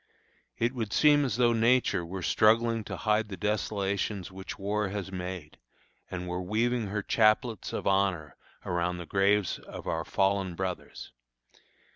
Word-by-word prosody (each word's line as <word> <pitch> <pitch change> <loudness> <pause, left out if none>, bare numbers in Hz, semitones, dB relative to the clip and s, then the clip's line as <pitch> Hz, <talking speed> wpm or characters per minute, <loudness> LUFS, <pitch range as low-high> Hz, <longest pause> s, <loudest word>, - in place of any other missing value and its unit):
It 120 +2 0
would 110 -5 -3
seem 145 -1 +5
as 120 -4 -2
though 120 -1 +4
Nature 115 -4 +3
were 90 +2 -6
struggling 115 +3 +3
to - - -5
hide 110 0 +1
the 95 - -6
desolations 100 0 -2
which 95 0 -8
war 105 0 -1
has 100 -1 -5
made, 90 -4 -6 0.5
and 90 0 -5
were 90 +1 -3
weaving 115 +4 0
her 105 +1 -3
chaplets 110 -1 +2
of - - -4
honor 95 -6 +1 0.3
around 90 0 -1
the 85 - -6
graves 100 +1 +2
of - - -10
our - - -1
fallen 95 -2 0
brothers. 95 -1 -5
100 Hz, 150 wpm, -29 LUFS, 90-110 Hz, 0.5 s, seem